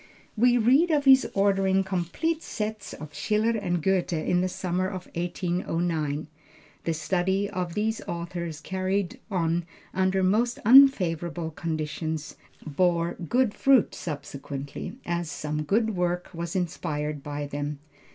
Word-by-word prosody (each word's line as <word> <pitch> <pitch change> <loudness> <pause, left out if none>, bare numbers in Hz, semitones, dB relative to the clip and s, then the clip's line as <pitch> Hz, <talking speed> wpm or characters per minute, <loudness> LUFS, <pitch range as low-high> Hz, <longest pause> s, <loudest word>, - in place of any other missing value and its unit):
We 245 +2 +4
read 265 +9 +4
of 295 -3 +2
his 265 0 +7
ordering 195 -1 +3
complete 190 - -1
sets 215 - -4
of 150 -1 -9
Schiller 215 +2 +1
and 180 -7 -1
Goethe 190 -2 +1
in 175 +2 +1
the 185 - +1
summer 185 0 -1
of 185 -2 -6
1809. 170 -3 -1 0.6
The 165 - +1
study 185 +5 0
of 180 -3 -4
these 220 +1 0
authors 170 -2 -4
carried 190 +1 -2
on 170 -3 0 0.3
under 190 0 +2
most 225 +6 +2
unfavorable 175 - +5
conditions, 155 -1 -3 0.3
bore 170 +2 +1
good 235 +5 0
fruit 270 -4 +4
subsequently, 140 -2 -6
as 170 -1 -2
some 150 +1 -3
good 220 +7 +1
work 175 0 -1
was 170 +1 -5
inspired 150 -4 -2
by 145 +1 -4
them. 145 +1 -4
175 Hz, 130 wpm, -26 LUFS, 160-200 Hz, 0.6 s, his